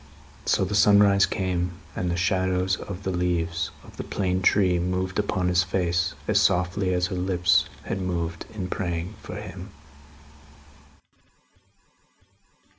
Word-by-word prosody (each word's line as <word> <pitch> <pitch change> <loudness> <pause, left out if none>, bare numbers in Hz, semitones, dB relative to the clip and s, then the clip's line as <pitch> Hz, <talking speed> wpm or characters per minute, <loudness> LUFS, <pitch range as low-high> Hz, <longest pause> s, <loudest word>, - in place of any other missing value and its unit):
So, - - +3
the 100 - -4
sunrise 100 -1 +5
came, 90 -2 -1 0.2
and 90 - -1
the 85 - 0
shadows 95 0 +1
of 100 +1 -8
the 95 - -1
leaves 85 -2 -1
of - - -15
the - - -4
plane 95 -1 -1
tree 90 -2 +3
moved 90 +1 -1
upon 90 -1 0
his 90 -1 +3
face, 90 -2 0
as - - +3
softly 90 +2 +1
as 90 -1 +1
her - - -2
lips 90 -1 +2
had 95 - -3
moved 85 -2 -3
in 100 -4 -4
praying 90 +1 -3
for - - -8
him. 100 -2 -8
90 Hz, 135 wpm, -25 LUFS, 90-95 Hz, 0.2 s, sunrise